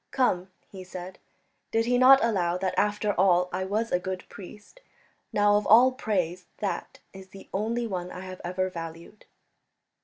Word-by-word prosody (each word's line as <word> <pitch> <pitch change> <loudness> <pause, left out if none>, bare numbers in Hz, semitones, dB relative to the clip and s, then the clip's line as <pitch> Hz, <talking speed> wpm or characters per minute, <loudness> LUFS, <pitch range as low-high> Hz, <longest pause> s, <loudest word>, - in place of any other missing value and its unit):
"Come," 185 -8 0 0.2
he 190 -2 -9
said, 185 0 -9 0.5
"did 225 0 +1
he 245 +1 +2
not 265 0 +7
allow 180 -6 +1
that 185 0 -2
after 210 0 +1
all 180 -1 +3
I 190 +1 -2
was 215 +4 -2
a 180 - +2
good 185 0 -5
priest? 205 - -13 0.5
Now, 205 0 +3
of 210 - -2
all 240 +5 +7
praise, 180 -7 -2
that 205 -2 -4 0.2
is 190 0 -11
the 195 +1 -14
only 230 +4 -1
one 180 -4 -4
I 180 - -8
have 185 0 -9
ever 185 +2 -1
valued." 165 +4 -9
190 Hz, 165 wpm, -27 LUFS, 180-215 Hz, 0.5 s, not